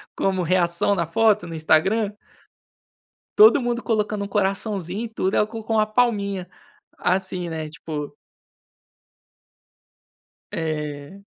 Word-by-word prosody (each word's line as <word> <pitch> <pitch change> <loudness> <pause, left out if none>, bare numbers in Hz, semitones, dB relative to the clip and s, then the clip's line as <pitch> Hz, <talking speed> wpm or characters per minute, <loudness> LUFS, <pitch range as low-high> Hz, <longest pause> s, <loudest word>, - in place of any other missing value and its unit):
como 190 -2 0
reação 175 +2 +2
na 170 -3 -1
foto, 215 -1 +2
no 165 - -6
Instagram. 190 +7 +2 1.3
Todo 425 -8 +8
mundo 240 -1 -2
colocando 210 -2 -1
um 200 - -6
coraçãozinho 200 0 -1
e - - -8
tudo, 210 -3 -2
ela 210 - +3
colocou 225 0 -4
uma 215 - +3
palminha, 205 -5 0 0.5
assim, 185 -1 -1
né, 160 -1 -4
tipo 150 -1 -6 2.4
É. 150 +3 -5
195 Hz, 110 wpm, -23 LUFS, 170-215 Hz, 2.4 s, Todo